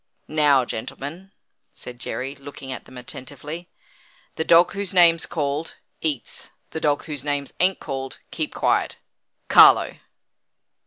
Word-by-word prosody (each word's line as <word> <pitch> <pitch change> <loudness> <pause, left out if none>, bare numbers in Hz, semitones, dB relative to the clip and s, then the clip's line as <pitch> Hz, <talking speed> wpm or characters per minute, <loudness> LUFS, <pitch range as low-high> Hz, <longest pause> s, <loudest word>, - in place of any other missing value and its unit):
"Now, 145 -4 +3
gentlemen," 150 +12 -7 0.4
said 125 0 -9
Jerry, 130 +2 -4
looking 140 -1 -9
at - - -6
them 130 - -13
attentively: 150 +7 -7 0.6
"The 160 - -2
dog 170 +2 +5
whose 200 -1 -4
name's 170 -2 +5
called, 150 0 -2 0.3
eats. 140 -9 -2 0.2
The 160 - -5
dogs 145 -1 +1
whose 145 -4 -5
names 145 -1 -2
an't 185 +1 +3
called, 135 -2 -5
keep - - -2
quiet. - - +1 0.5
Carlo." - - +7
145 Hz, 125 wpm, -23 LUFS, 135-165 Hz, 0.6 s, Carlo